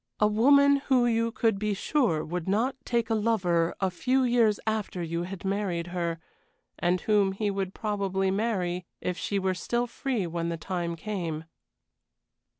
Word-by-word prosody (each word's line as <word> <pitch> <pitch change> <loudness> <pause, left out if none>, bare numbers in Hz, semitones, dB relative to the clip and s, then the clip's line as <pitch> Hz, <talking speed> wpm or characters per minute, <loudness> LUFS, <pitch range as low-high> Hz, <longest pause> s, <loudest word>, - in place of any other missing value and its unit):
A 210 - +5
woman 280 +7 +5
who 255 -3 +4
you 230 -1 +1
could 225 -4 +1
be 210 -1 0
sure 200 - +1
would 175 +1 -4
not 225 +7 +1
take 235 -1 0
a - - +4
lover 185 -7 +1
a 190 -1 +1
few 260 +8 +1
years 235 -4 +3
after 215 -5 -2
you 170 +1 -2
had 195 -1 -7
married 190 -4 -1
her, 170 -2 -1 0.6
and 175 +1 +2
whom 205 -3 +2
he 205 +1 -1
would 195 -1 -3
probably 195 -3 -1
marry 185 -4 -1
if 180 - -2
she 200 - -2
were 190 -1 +1
still 235 +7 -1
free 240 -3 -2
when 170 0 -2
the 170 - -3
time 170 0 -3
came. 165 -3 -4
195 Hz, 165 wpm, -28 LUFS, 175-225 Hz, 0.6 s, A